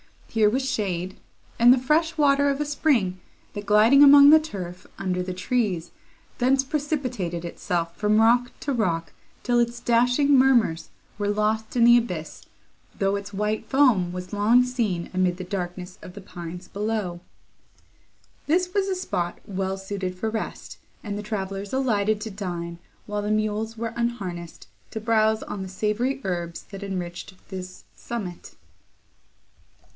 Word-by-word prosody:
Here 220 -2 +3
was 260 +4 -1
shade, 190 -7 -2 0.4
and 240 +1 +8
the 260 - +6
fresh 310 +6 +1
water 285 -1 +4
of 275 0 -1
a - - 0
spring, 255 - +1 0.3
that, 205 -1 -6
gliding 215 +7 +6
among 285 0 +9
the 315 +1 +9
turf, 185 - -7
under 185 -2 -1
the 180 0 -4
trees, 185 -3 -1 0.5
thence 265 +2 +3
precipitated 265 - -2
itself 170 0 -3
from 210 +1 +2
rock 240 +2 +4
to 280 - -1
rock, 170 -8 -1 0.3
till 245 -1 +2
its 235 0 0
dashing 245 +4 +3
murmurs 250 -11 +3 0.3
were 205 - -1
lost 215 +2 0
in 240 - +4
the 240 +1 +8
abyss, 180 -10 -4 0.5
though 195 0 +1
its 200 0 -8
white 210 +2 -2
foam 245 -11 +3
was 180 +2 -7
long 220 +5 +4
seen 225 -9 -2
amid 185 -1 +1
the 185 - -5
darkness 180 0 -5
of 180 - -10
the 200 - -9
pines 180 -1 -8
below. 205 -4 -3 1.3
This 360 +4 +1
was 400 -1 +1
a 380 - 0
spot 175 - -3
well 195 -1 -3
suited 190 -1 -4
for 220 +4 -2
rest, 220 - -5 0.2
and 205 -2 -4
the - - -4
travellers 195 -1 -4
alighted 215 -5 +1
to 220 0 -5
dine, 175 -4 -5 0.3
while 210 0 -3
the 205 - -3
mules 215 +1 -1
were 230 0 -4
unharnessed 190 -8 -4 0.2
to 220 - -5
browse 220 -1 +2
on 210 -2 -6
the 190 - -6
savoury 220 +8 -1
herbs 175 -2 -3
that 200 0 -7
enriched 180 -1 -5
this 185 -1 -8
summit. 195 -7 -7
210 Hz, 155 wpm, -25 LUFS, 185-245 Hz, 1.3 s, among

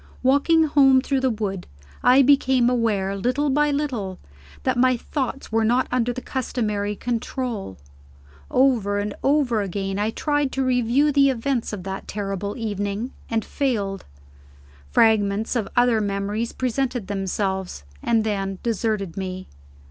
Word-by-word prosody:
Walking 285 +5 +4
home 275 -3 +5
through 270 +1 0
the 260 0 +1
wood, 205 -5 -3 0.3
I 260 +2 +6
became 260 -3 +4
aware, 210 -5 0
little 255 +8 0
by 295 +2 +3
little, 255 -11 -2 0.5
that - - +1
my 255 0 +3
thoughts 270 +1 -4
were 225 0 +2
not 245 +4 +2
under 245 -1 +1
the 255 +1 -6
customary 210 -5 -2
control. 230 - -4 0.7
Over 235 -7 +2
and 205 0 -2
over 270 -6 +2
again, 195 0 -3
I 210 +1 +1
tried 290 +3 0
to 270 - 0
review 255 +3 +2
the 280 -1 +4
events 255 -1 -1
of 205 -4 -6
that 190 +1 -6
terrible 200 0 -4
evening, 205 +1 -3 0.2
and 225 -1 -1
failed. 205 -9 -2 0.8
Fragments 215 - +2
of 230 -4 0
other 245 -3 +3
memories 205 +3 -2
presented 255 -2 -2
themselves 190 - -3 0.2
and 225 -2 +2
then 195 -3 -2
deserted 215 -5 -1
me. 185 -1 -5
230 Hz, 140 wpm, -23 LUFS, 200-260 Hz, 0.8 s, I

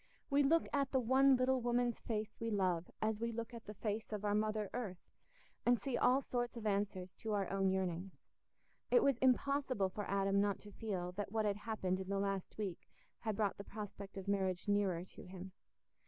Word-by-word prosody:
We 280 +1 +5
look 320 +4 +4
at 280 -2 +2
the 265 - +2
one 265 +3 +5
little 255 0 +2
woman's 240 0 +1
face 215 -2 -3
we 230 - -1
love 185 -5 +1
as 215 -1 +1
we 230 +1 -1
look 230 +1 -5
at 230 -1 -8
the 210 - -7
face 215 +2 -3
of 210 -1 -3
our 205 - +2
mother 215 0 +1
earth, 210 -8 -5 0.5
and 245 -1 +4
see 270 -3 -2
all 260 +3 +4
sorts 240 -1 -2
of 225 - -6
answers 195 -3 -1
to 220 -2 -3
our 200 -2 +1
own 195 -1 +2
yearnings. 185 0 -2 0.7
It 485 - +6
was 275 -4 +3
impossible 260 -5 +2
for 205 +2 -5
Adam 195 0 +3
not 200 -1 +1
to 205 - -11
feel 190 -5 -3
that 205 -2 -3
what 220 -1 +1
had 205 -1 +1
happened 205 -4 -1
in 190 0 -5
the 200 - 0
last 195 -1 -2
week 195 -5 -4 0.3
had 220 -2 -2
brought 205 -1 0
the - - -4
prospect 200 -2 -7
of 195 0 -6
marriage 190 -2 0
nearer 195 -4 +2
to - - -12
him. 185 +1 -8
210 Hz, 205 wpm, -37 LUFS, 195-240 Hz, 0.7 s, It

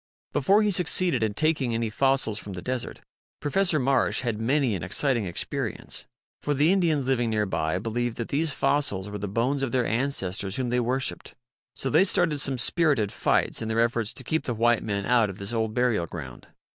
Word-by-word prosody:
Before 200 +10 +3
he 210 - +2
succeeded 180 -3 +1
in 110 -2 -1
taking 145 -6 0
any 115 0 -1
f 110 - -7
ossijs 135 -6 +2
from 100 - -8
the 90 - -6
desert, 125 -1 -4 0.4
Professor 175 +3 +1
Marsh 135 -1 +1
had 115 -4 -3
many 130 0 +1
an 90 - -3
exciting 115 - +1
experience. 90 -2 -3 0.3
For 145 - -1
the 150 +5 +3
Indians 160 -8 +1
living 120 -3 +1
near 105 -1 0
by 85 -3 -1
believed 115 +3 -3
that 115 - -4
these 155 +3 0
fossils 105 -9 0
were 105 - -5
the 105 - -4
bones 120 +7 -1
of 135 -3 -2
their 125 -1 +1
ancestors 105 -6 0
whom 125 -2 -2
they 125 - +2
worshiped. 130 +2 -2 0.4
So 135 - -2
they 185 - +5
started 170 -6 +2
some 135 -2 +1
spirited 130 - +2
fights - - +1
in 110 - -3
their 110 +1 -1
efforts 115 -1 +1
to 130 - -6
keep 160 +5 -2
the 120 - -2
white 120 +1 +2
men 100 -2 -3
out 115 -2 +3
of 95 - -8
this 100 +3 -2
old 110 -1 -1
burial 120 -8 +1
ground. 65 -8 -9
120 Hz, 205 wpm, -26 LUFS, 105-140 Hz, 0.4 s, they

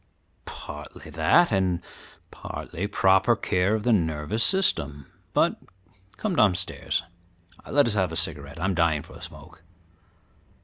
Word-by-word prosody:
"Partly - - -9
that, 175 - +4
and 95 -3 +1 0.5
partly 90 +4 -5
proper 95 +4 +4
care 95 -1 +1
of 110 - -3
the 120 - +3
nervous 80 +4 0
system; 75 - +1 0.3
but - - +2 0.6
come 205 -4 -2
downstairs, 95 - +1 0.6
and - - -8
let 145 - +6
us 115 - +2
have 95 -5 +1
a - - -5
cigarette; 70 0 -2
I 85 - -1
am 95 - +1
dying 85 -4 +2
for - - -15
a - - -12
smoke." 85 -1 -11
95 Hz, 140 wpm, -26 LUFS, 80-110 Hz, 0.6 s, let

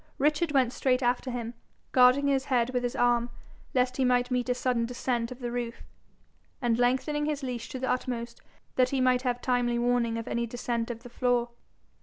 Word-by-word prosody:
Richard 300 +3 +2
went 260 -3 +2
straight 255 -1 +1
after 245 +2 +1
him, 240 -1 -4 0.4
guarding 255 +2 +5
his 275 -1 +1
head 250 -3 +1
with 250 -1 0
his 245 -1 -2
arm, 240 0 +2 0.5
lest 255 0 +1
he 265 - +2
might 250 0 +2
meet 250 0 0
a 250 - +2
sudden 245 -2 0
descent 240 -1 -2
of 255 - -7
the 240 -1 -3
roof, 240 -1 -4 0.8
and 240 -3 +1
lengthening 280 +5 +1
his 295 -2 -2
leash 245 -3 -4
to 265 - -5
the 260 0 -3
utmost, 240 -2 -3 0.4
that 255 -1 +4
he 270 - -1
might 255 -1 +3
have 245 -1 -2
timely 245 -1 +1
warning 240 -1 +1
of 230 - -5
any 235 0 -1
descent 235 0 -3
of 230 -1 -6
the 245 - -10
floor. 245 -1 +1
245 Hz, 200 wpm, -28 LUFS, 240-255 Hz, 0.8 s, guarding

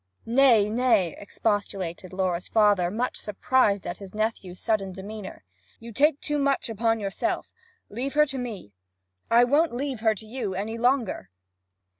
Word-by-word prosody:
'Nay, 235 -3 +5
nay,' 220 -6 +2
expostulated 200 -4 -3
Laura's 185 -2 -1
father, 205 -5 +3
much 235 +6 -2
surprised 210 -1 +1
at 175 - -5
his 195 0 -10
nephew's 215 -4 -2
sudden 200 -4 0
demeanour. 195 - -8 0.4
'You 235 0 -10
take 290 +4 +3
too 295 0 -2
much 275 -4 0
upon 225 +1 +1
yourself. 195 -2 -3 0.3
Leave 260 +7 -4
her 300 0 +6
to 270 -2 -5
me.' 215 - -6 0.6
'I 235 +1 +6
won't 285 +2 +2
leave 265 -1 -3
her 220 -1 +2
to 220 - -9
you 215 -4 -4
any 220 +4 -4
longer!' 240 - 0
220 Hz, 150 wpm, -26 LUFS, 195-250 Hz, 0.6 s, her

